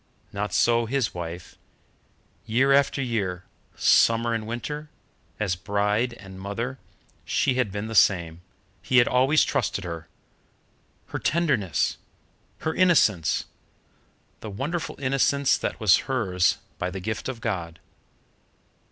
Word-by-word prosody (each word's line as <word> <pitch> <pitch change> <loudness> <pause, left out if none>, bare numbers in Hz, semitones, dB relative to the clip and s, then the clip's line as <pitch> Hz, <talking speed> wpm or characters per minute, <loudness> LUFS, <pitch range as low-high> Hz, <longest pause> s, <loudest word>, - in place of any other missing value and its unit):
Not 105 0 -3
so 115 +4 +2
his 130 -3 0
wife. 85 0 -7 0.9
Year 130 +5 +3
after 140 0 +2
year, 100 -7 -2 0.3
summer 115 +1 +4
and 110 -1 -3
winter, 150 +6 -5 0.5
as 100 -4 0
bride 105 +5 0
and 95 -3 -12
mother, 115 +7 -4 0.4
she 135 - +1
had 125 -5 0
been 100 +2 -4
the 110 - -6
same, 85 -5 +3 0.4
he 120 +7 +1
had 120 - +6
always 130 +5 +4
trusted 125 -7 -1
her. 85 -2 -6 1.0
Her - - -4
tenderness! 140 - 0 0.6
Her 160 - -1
innocence! 135 - +3 0.9
The 110 - -7
wonderful 150 - -4
innocence 135 +1 +2
that - - -3
was 105 -6 +5
hers 95 -9 +1 0.2
by 90 - -1
the 95 +1 -6
gift 110 +6 -4
of 125 -3 -5
God. 90 -8 -4
110 Hz, 125 wpm, -25 LUFS, 95-130 Hz, 1.0 s, had